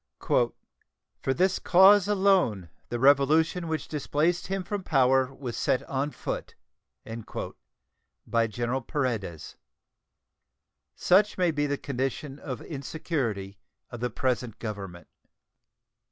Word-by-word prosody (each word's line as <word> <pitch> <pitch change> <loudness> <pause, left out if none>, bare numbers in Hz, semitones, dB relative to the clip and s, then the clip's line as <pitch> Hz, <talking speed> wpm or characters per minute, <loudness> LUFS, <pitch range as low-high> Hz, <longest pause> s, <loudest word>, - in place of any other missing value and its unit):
"For - - +2 0.7
this 180 +8 +2
cause 190 +2 +6
alone 190 - +2 0.2
the 120 - -2
revolution 150 +6 +3
which 160 -1 -3
displaced 155 +4 0
him 195 0 -2
from 205 +2 -3
power 130 -5 +3
was 130 -4 -6
set 125 - +1
on 140 +2 -2
foot" - - -5 1.7
by 115 -1 +1
General 120 +4 -2
Paredes. 115 - -3 1.4
Such 200 +4 +3
may 180 -2 +3
be 145 -1 0
the 145 0 -1
condition 135 +2 -4
of 130 -5 -6
insecurity 130 - -4 0.3
of 120 - -7
the 125 +1 -1
present 125 -4 -2
Government. 95 -6 -7
135 Hz, 110 wpm, -27 LUFS, 120-165 Hz, 1.7 s, cause